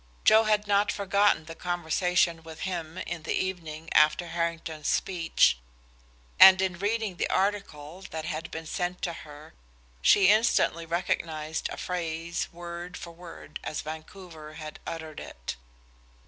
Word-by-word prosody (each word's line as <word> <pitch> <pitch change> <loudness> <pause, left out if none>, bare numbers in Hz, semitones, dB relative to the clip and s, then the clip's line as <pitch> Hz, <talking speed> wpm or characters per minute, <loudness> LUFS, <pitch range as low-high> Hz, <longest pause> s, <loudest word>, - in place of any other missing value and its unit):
Joe 220 +1 +7
had 210 -1 +2
not 205 0 +3
forgotten 200 -4 +2
the 165 - -8
conversation 175 0 0
with 160 0 -11
him 175 -3 -4
in 170 -2 -5
the - - -2
evening 165 -4 -4
after 155 +3 +4
Harrington's 165 -2 -3
speech, 170 - +2 0.8
and 190 -1 +10
in 185 -2 -1
reading 205 -2 -1
the - - -1
article 190 -5 -1
that 160 0 -5
had 160 +1 -4
been 160 0 -6
sent 180 +2 -3
to 170 - -1
her 150 -1 -12 0.5
she 195 -2 +6
instantly 210 -6 +3
recognized 160 -2 -2
a - - -6
phrase, 170 -1 -3
word 175 +1 -7
for 170 - -8
word 170 0 -10
as 155 - -3
Vancouver 155 0 -9
had 155 -1 -8
uttered 160 -2 -6
it. - - -7
170 Hz, 140 wpm, -28 LUFS, 160-185 Hz, 0.8 s, and